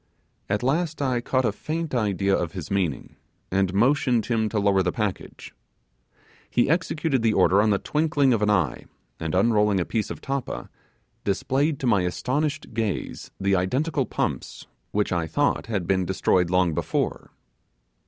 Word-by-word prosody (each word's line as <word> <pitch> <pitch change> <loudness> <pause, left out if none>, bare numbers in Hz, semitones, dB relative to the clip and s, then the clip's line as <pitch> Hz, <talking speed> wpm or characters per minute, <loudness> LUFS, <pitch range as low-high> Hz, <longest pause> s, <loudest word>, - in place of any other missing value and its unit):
At 105 +3 0
last 155 +5 0
I 130 -4 0
caught 130 +1 0
a 110 - +2
faint 160 +8 -4
idea 100 -4 +1
of 85 -2 -2
his 90 -3 -7
meaning, 90 -8 -2 0.3
and 95 0 +1
motioned 120 +2 +2
him 110 -3 0
to 110 - -3
lower 100 -1 +3
the 90 -1 0
package. 105 -2 -4 1.0
He 125 +3 +2
executed 160 -5 0
the 115 -1 +2
order 95 +1 +4
in 110 - +2
the 100 - +3
twinkling 150 0 +1
of 110 - 0
an 105 - +2
eye, 90 -8 +1 0.3
and 80 0 -2
unrolling 105 0 +3
a 85 - 0
piece 110 -2 -2
of - - -6
tappa, 135 - -4 0.5
displayed 135 +9 0
to - - -2
my 105 -6 +3
astonished 140 - -2
gaze 110 -3 -3
the 100 0 +2
identical 130 - 0
pumps - - -3 0.2
which 105 0 0
I 85 -3 0
thought 80 - 0
had 100 -6 -2
been 95 +1 +1
destroyed 90 -1 +2
long 90 -2 +2
before. - - -2
105 Hz, 165 wpm, -25 LUFS, 95-130 Hz, 1.0 s, order